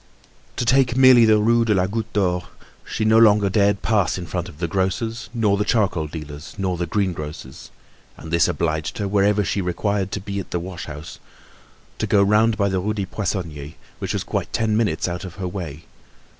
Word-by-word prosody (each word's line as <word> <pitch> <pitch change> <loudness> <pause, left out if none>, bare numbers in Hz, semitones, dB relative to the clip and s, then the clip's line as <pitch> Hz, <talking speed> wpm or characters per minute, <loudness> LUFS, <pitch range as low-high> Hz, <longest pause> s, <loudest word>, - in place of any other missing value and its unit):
To - - -2
take 130 0 +3
merely 130 -3 +7
the 110 -1 +5
Rue 115 +2 +3
de 110 -2 +2
la 90 -1 +2
Goutte 110 +2 -4
d'Or, 90 -3 0 0.4
she 110 - -3
no 110 +1 +5
longer 105 -3 +5
dared 100 -1 +2
pass 100 -7 +1
in 90 - -5
front 85 +2 -4
of 75 - -14
the 85 +1 -2
grocer's, 95 +7 -2
nor 110 -4 +1
the 105 - +1
charcoal 100 -8 +1
dealer's, 75 -1 -9
nor 95 -2 -1
the 85 0 -3
greengrocer's; 80 -8 -4 0.5
and 80 - -10
this 85 - +4
obliged 80 -2 -2
her, 100 - -2
whenever 100 +1 +2
she 100 - -1
required 95 +2 -1
to - - -2
be 100 +1 -5
at 95 - -7
the 90 - -2
wash 85 -1 -7
house, 75 +2 -9 0.8
to - - -1
go 100 -1 +4
round 105 +2 +3
by 100 -2 +2
the 95 -1 0
Rue 105 +3 -2
des 100 -2 -2
Poissonniers, 85 -7 -4 0.2
which - - -3
was - - -2
quite - - -3
ten 110 -1 0
minutes 105 -8 0
out 85 0 -4
of 95 -2 -8
her 95 -2 -4
way. 85 -4 -6
100 Hz, 205 wpm, -22 LUFS, 85-105 Hz, 0.8 s, merely